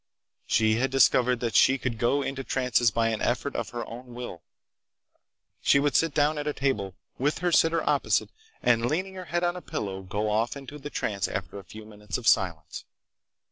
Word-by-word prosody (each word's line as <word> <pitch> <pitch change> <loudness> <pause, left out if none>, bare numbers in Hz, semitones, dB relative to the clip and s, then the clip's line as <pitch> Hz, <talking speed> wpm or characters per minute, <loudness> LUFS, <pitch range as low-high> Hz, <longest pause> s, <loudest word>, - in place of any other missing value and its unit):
She 110 0 +3
had 130 +3 +1
discovered 125 -1 +3
that 115 -2 -1
she 135 - +5
could 120 -4 -3
go 140 +4 +2
into 135 0 -4
trances 125 -3 +2
by 115 +2 +1
an 110 -1 -2
effort 130 +4 -1
of 115 - -3
her 120 -1 -5
own 120 +1 -10
will. 120 -9 -7 1.2
She - - +4
would 145 -1 0
sit 165 -1 +3
down 150 +1 +1
at 145 - -4
a 150 - 0
table, 105 -10 -1 0.2
with 145 +4 +1
her 175 0 0
sitter 165 0 +3
opposite, - - +1 0.3
and 120 -1 +3
leaning 185 +7 -2
her 185 -1 -8
head 175 0 -1
on 175 0 +1
a 180 - -7
pillow, 100 - -4
go 105 +3 -3
off 110 +5 0
into 140 +2 -9
the 145 +1 -7
trance 100 -8 -2
after 100 - -5
a - - -11
few 105 +5 -11
minutes 105 -2 -6
of 125 - -9
silence. 80 -8 +1
125 Hz, 200 wpm, -27 LUFS, 110-145 Hz, 1.2 s, she